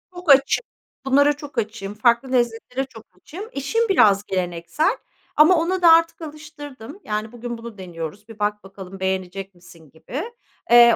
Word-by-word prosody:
Çok 355 -2 -7
açığım. 275 - +4 0.4
Bunlara 285 +2 +4
çok 290 0 -11
açığım. 215 -3 -3
Farklı 235 +4 +2
lezzetlere 245 +1 0
çok 225 -4 -13
açığım. 380 - -9
Eşim 450 - 0
biraz 205 - +5
geleneksel, 185 - -1 0.4
ama 315 +4 +6
ona 365 +3 -1
da 340 -2 +8
artık 330 0 +4
alıştırdım. 295 - -10
Yani, 215 +1 -3
bugün 240 0 -6
bunu 230 -2 -10
deniyoruz, 180 +2 -7
bir 225 -1 -12
bak 210 0 -1
bakalım, 195 -1 -11
beğenecek 190 0 -3
misin 170 -3 -17
gibi. 245 - -6 0.5
Eee, 235 -1 +8
235 Hz, 155 wpm, -22 LUFS, 195-295 Hz, 0.5 s, da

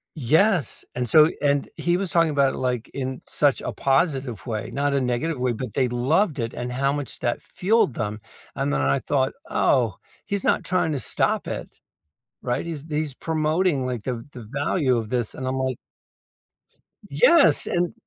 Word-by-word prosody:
Yes, 160 - +2
and 125 -1 -3
so 155 +6 +7
and 140 -1 +2
he 175 0 +1
was 190 -1 -3
talking 165 -1 +3
about 140 -3 +2
it, - - -6
like, 125 -2 -1
in 130 -1 -4
such 145 -2 +1
a - - -3
positive 135 -4 0
way, 110 -3 -3
not 140 0 0
a 140 - +2
negative 125 +4 -1
way, 125 -1 +1
but 115 -2 -6
they 130 +1 +2
loved 140 - +1
it 115 -2 -3
and 125 0 -4
how 135 +2 +1
much 145 -2 -5
that 120 - -1
fueled 195 - +1
them, 105 0 -3 0.3
and 70 - -1
then 70 -1 +1
I 70 0 +2
thought, 135 -2 0 0.2
"Oh, 115 -8 +2 0.3
he's 200 -1 -2
not - - +2
trying 175 -3 0
to 145 - -1
stop - - -1
it, - - -6 0.6
right? 125 +5 -2
He's 160 -4 -5
he's 150 -2 -2
promoting 155 0 0
like 125 -4 -3
the 120 -3 -4
the 120 - -9
value 140 -2 +1
of 115 -2 -3
this." 120 -1 -2
And 130 - -4
I'm 130 - -1
like 130 -1 -1 1.3
Yes, 340 -11 +5
and 175 0 0
135 Hz, 185 wpm, -24 LUFS, 125-155 Hz, 1.3 s, so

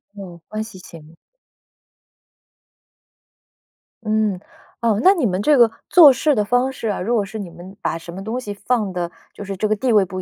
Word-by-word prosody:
哦， 180 -4 -10
关 215 0 -4
系 220 -3 -12
行。 165 -2 -14 2.9
嗯， 215 -3 0 0.4
哦， 220 -3 +1
那 380 - +7
你 330 -10 -1
们 190 -2 0
这 295 +6 +4
个 235 -2 +6 0.2
做 310 -6 +8
事 295 +3 +1
的 210 -5 0
方 245 +4 +1
式 230 -3 -6
啊， 205 - -2
如 235 +6 0
果 205 - +1
是 215 +3 -8
你 195 -4 -6
们 175 +3 -12
把 165 - -2
什 165 +1 -10
么 190 +2 -7
东 225 +4 -3
西 210 -5 -6
放 205 -1 -2
的 175 -1 -3 0.2
就 205 - -9
是 195 -1 -6
这 215 - 0
个 215 - +1
地 245 +4 -1
位 210 -3 +4
不 185 +1 -6
210 Hz, 210 characters per minute, -20 LUFS, 185-235 Hz, 2.9 s, 做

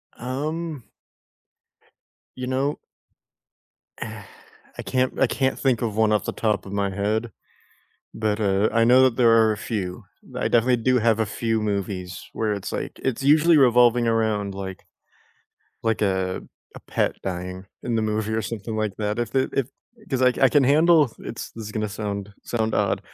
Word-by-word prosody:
Um 150 +3 -4 1.5
You 130 0 -5
know 135 +3 -1 1.2
Eh, - - -6 0.6
I - - -4
can't 130 0 -1
I 135 - +4
can't 130 +1 0
think 130 -4 +1
of 110 -3 -2
one 110 -1 +3
off 105 -2 +1
the - - -2
top 105 -4 -1
of 95 - -8
my 100 -1 0
head. 105 +4 -1 0.8
But, 110 -1 -1
uh, 100 +1 +2
I 115 0 +4
know 125 +2 +6
that 130 -3 +3
there 120 -2 +5
are 110 -1 +5
a - - -4
few. 95 -6 -4 0.3
I - - -1
definitely 120 +1 +3
do 130 +2 +2
have 115 -1 +2
a 110 - +1
few 115 +1 -1
movies 100 -3 -3
where 110 -2 -1
it's, 100 - -6
like - - -5
it's 130 -1 -1
usually 155 +3 +5
revolving 120 -2 +5
around 110 -3 0
like 95 -1 -7 1.0
like 115 -1 0
a 95 -2 0 0.3
a - - -10
pet - - -1
dying 90 0 -5 0.2
in 120 - -1
the 110 - +1
movie 110 0 -1
or 110 - 0
something 110 0 -5
like 105 -3 -2
that, 105 +1 -2
if 120 +1 -4
it 130 - +2
if 135 -2 0 0.4
'cause 130 -2 0
I 125 0 +5
c - - -7
I 135 - +6
can 145 -1 +4
handle, 150 -1 +4
it's - - -7
this 115 - -8
is 105 - -7
gonna 110 0 -2
sound 100 -1 -4
sound 110 -2 -1
odd. - - +1
110 Hz, 180 wpm, -24 LUFS, 105-125 Hz, 1.5 s, know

